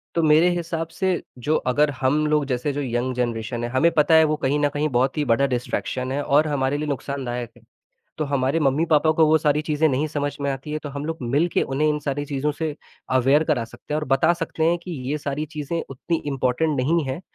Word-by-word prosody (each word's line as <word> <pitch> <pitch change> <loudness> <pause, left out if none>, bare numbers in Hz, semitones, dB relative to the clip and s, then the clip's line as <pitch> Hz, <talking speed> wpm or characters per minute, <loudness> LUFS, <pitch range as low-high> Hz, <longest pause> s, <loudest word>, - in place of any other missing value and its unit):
तो 170 - +2
मेरे 155 +3 +5
हिसाब 165 -1 -3
से 190 +3 -3 0.4
जो 155 +1 +2
अगर 145 +4 +3
हम 145 +4 +2
लोग 150 -1 +2
जैसे 130 +2 -1
जो 145 - -2
यंग 125 0 -1
जनरेशन 120 -1 -2
हैं, 120 - -2
हमें 160 +6 +3
पता 155 +1 +3
है 160 - +7
वो 155 0 +1
कहीं 140 +3 +2
न 145 0 +2
कहीं 145 +2 -1
बहुत 130 +3 +1
ही 150 - +1
बड़ा 125 +3 +3
डिस्ट्रैक्शन 125 +1 -3
है 145 +1 -1
और 150 +3 +3
हमारे 140 -1 0
लिए 150 - -3
नुकसानदायक 130 -4 -4
है, - - -19 0.6
तो 155 - -1
हमारे 135 +3 +1
मम्मी-पापा 155 +2 +3
को 160 0 +4
वो 160 - +5
सारी 150 -1 +1
चीज़ें 155 0 +1
नहीं 140 +4 0
समझ 145 -1 -3
में 140 - 0
आती 135 +3 -6
है, 155 - -2
तो 150 - -7
हम 140 +1 -5
लोग 160 0 -3
मिलके 145 +8 +1
उन्हें 135 +3 0
इन 150 0 +1
सारी 145 0 -3
चीज़ों 145 +1 -1
से 150 0 -4 0.4
अवेयर 135 +5 +4
करा 150 -7 0
सकते 115 +5 -9
हैं 155 - +1
और 150 - -4
बता 135 +6 +3
सकते 160 -1 -2
हैं 170 +1 +3
कि 180 - -7 0.2
ये 150 - 0
सारी 145 +1 -3
चीज़ें 150 +3 -2
उतनी 150 +5 -2 0.2
इम्पोर्टेंट 135 +4 0
नहीं 160 +6 +1
हैं 130 +6 -4
145 Hz, 230 wpm, -23 LUFS, 130-155 Hz, 0.6 s, है